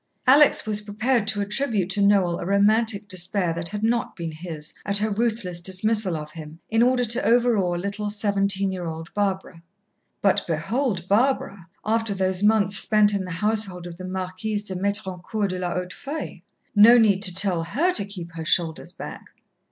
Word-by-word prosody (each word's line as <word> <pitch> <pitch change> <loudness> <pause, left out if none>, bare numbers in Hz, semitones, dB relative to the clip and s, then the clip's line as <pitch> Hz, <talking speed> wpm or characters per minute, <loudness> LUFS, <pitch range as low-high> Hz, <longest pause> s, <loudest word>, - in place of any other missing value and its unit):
Alex 280 +3 +5
was 210 -1 0
prepared 215 +2 -1
to 205 -1 +1
attribute 210 -2 -1
to 205 - 0
Noel 195 -4 +3
a - - -5
romantic 205 +1 +2
despair 185 -1 +2
that 170 0 -4
had 210 +1 -5
not 235 +1 0
been 170 -3 -5
his, 155 -1 -6
at 200 0 +1
her 215 +1 0
ruthless 215 -5 -1
dismissal 190 +1 +1
of 150 0 -8
him, 155 0 -10
in 225 +1 +3
order 250 0 +3
to 235 +2 -1
overawe 230 -7 +2
little, 200 +3 -4
seventeen 200 -2 0
year 180 -2 -5
old 160 0 -7
Barbara. 190 -4 -2 0.6
But 200 0 +3
behold 185 - -2
Barbara, 200 -5 0 0.2
after 225 -1 0
those 185 -1 0
months 205 -2 +3
spent 210 -1 +4
in 195 -2 -2
the - - -8
household 195 -1 -2
of 170 -1 -9
the 185 - -8
Marquise 190 +3 -4
de 200 -2 -4
Métrancourt 200 +1 -2
de 185 0 -4
la 175 -1 -3
Hautefeuille! 185 - -6 0.3
No 225 +4 +8
need 205 -4 +3
to 185 -4 -1
tell 185 -4 +1
her 295 - 0
to 205 - -1
keep 185 -4 -8
her 165 -1 -7
shoulders 160 0 -1
back. - - -9
200 Hz, 175 wpm, -23 LUFS, 180-215 Hz, 0.6 s, No